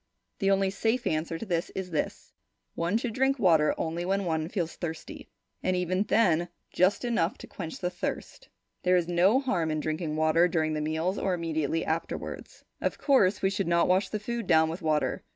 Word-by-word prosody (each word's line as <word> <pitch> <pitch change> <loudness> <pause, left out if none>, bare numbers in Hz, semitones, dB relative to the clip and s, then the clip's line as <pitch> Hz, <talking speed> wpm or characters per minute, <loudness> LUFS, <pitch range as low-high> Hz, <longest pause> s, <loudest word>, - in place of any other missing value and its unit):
The 195 - +2
only 195 -1 +2
safe 225 +5 0
answer 160 +1 -1
to 225 - -6
this 175 -3 -1
is 190 -2 -4
this: 155 - -3 0.4
one 170 +6 0
should 235 -1 -3
drink 265 +3 +2
water 165 -9 +4
only 165 +1 -2
when 195 +2 0
one 160 -1 -1
feels 175 -5 -3
thirsty, 160 -2 -7 0.3
and 185 - +1
even 180 +1 0
then 185 -9 +3
only 175 - -6 0.2
just 185 +6 +2
enough 225 -2 0
to - - -10
quench 165 -5 -7
the 180 -1 -2
thirst. 180 - -5 0.3
There 180 0 +3
is 170 -2 0
no 180 +8 +4
harm 245 - 0
in 155 0 -1
drinking 155 0 -2
water 160 +2 +4
during 160 -2 0
the 155 - -2
meals 160 +5 -1
or 190 -2 0
immediately 165 -2 -1
afterwards. 160 +1 -4 0.2
Of - - -1
course, 215 -11 +3
we 190 - +3
should 195 -2 -1
not 170 0 +3
wash 185 +1 +2
the 215 - -3
food 235 +2 -4
down 160 -1 +4
with 170 +4 -6
water. 155 -2 0
175 Hz, 200 wpm, -28 LUFS, 160-195 Hz, 0.4 s, water